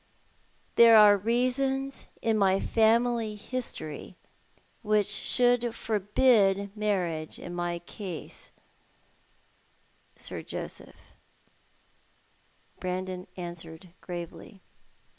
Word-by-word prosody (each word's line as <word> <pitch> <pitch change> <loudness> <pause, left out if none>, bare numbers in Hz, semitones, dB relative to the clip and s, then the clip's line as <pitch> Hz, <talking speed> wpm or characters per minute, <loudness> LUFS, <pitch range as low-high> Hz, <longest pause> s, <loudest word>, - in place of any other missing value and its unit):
"There 230 -1 +9
are 210 -1 +8
reasons 255 +5 0 0.2
in 225 -1 +2
my 195 -2 +3
family 225 0 +2
history 205 - -6 0.7
which 210 -2 +2
should 240 +3 +2
forbid 205 -2 +2
marriage 180 -7 -2
in 175 - -8
my 175 0 -2
case, 175 0 -7 1.7
Sir - - -5
Joseph," - - -9 1.7
Brandon 185 0 -4
answered, 170 0 -8
gravely. 175 +3 -8
205 Hz, 75 wpm, -28 LUFS, 180-230 Hz, 1.7 s, There